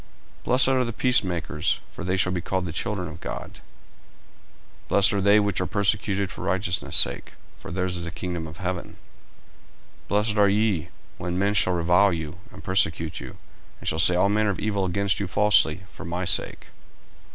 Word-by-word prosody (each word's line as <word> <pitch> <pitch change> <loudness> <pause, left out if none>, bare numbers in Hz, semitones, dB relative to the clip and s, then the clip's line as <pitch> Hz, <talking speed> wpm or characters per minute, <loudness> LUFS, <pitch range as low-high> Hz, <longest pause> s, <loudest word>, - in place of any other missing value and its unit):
40:005:009 - - -27
Blessed 125 +1 +5
are 130 -1 +3
the 115 -1 -4
peacemakers: 90 - +1
for - - -8
they 95 +2 0
shall 90 0 +2
be 90 -1 -2
called 95 +2 -2
the 85 - -4
children 90 +2 -3
of 75 - -10
God. - - -7 1.3
40:005:010 - - -29
Blessed 100 0 +4
are 100 - 0
they 100 +2 +5
which 100 -3 0
are 90 - -1
persecuted 100 -1 0
for - - -9
righteousness' 95 0 -1
sake: - - +1 0.3
for - - -10
theirs 90 0 -2
is 85 - -4
the - - -4
kingdom 85 -1 -5
of 80 +1 -11
heaven. 90 -1 -4 1.1
40:005:011 - - -29
Blessed 105 +1 0
are 100 -1 +5
ye, 100 -5 +1 0.3
when 90 0 -3
men 100 +2 +1
shall 95 -2 +3
revile 90 +3 +3
you, 80 -1 -5
and - - -12
persecute 80 -3 0
you, - - -9 0.4
and - - -9
shall 80 - 0
say 90 +2 +5
all 90 +2 +3
manner 105 +1 +1
of 100 - -2
evil 100 -2 -1
against 100 +2 0
you 100 - -2
falsely, 95 -4 +3
for - - -11
my 90 +1 -3
sake. - - -1
95 Hz, 195 wpm, -25 LUFS, 90-100 Hz, 1.3 s, Blessed